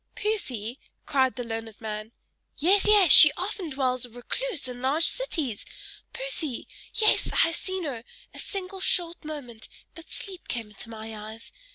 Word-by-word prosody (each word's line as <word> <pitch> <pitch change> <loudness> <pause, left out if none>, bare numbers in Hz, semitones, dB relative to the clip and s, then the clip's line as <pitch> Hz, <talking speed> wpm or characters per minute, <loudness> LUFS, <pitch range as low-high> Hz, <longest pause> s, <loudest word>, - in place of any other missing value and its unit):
"Poesy!" 260 - -2 0.3
cried 260 -2 +2
the 245 - -4
learned 225 -2 -6
man. 215 0 -6 0.5
"Yes, 385 +7 +3
yes, 410 -7 +6
she 300 - +11
often 370 -2 -3
dwells 255 -3 0
a 245 - -6
recluse 285 - -4
in 245 -1 -7
large 280 +6 +2
cities! 310 - -1 0.5
Poesy! 360 - -4 0.3
Yes, 430 -1 +3
I - - -7
have 330 0 +4
seen 375 -1 -3
her 255 -7 -4 0.3
a - - -10
single 385 -1 -5
short 345 -2 +2
moment, 275 -8 -8 0.2
but 330 0 -13
sleep 380 -4 -8
came 230 -3 -4
into 210 +2 -8
my 220 0 -8
eyes! 215 +2 -9
280 Hz, 160 wpm, -27 LUFS, 230-370 Hz, 0.5 s, she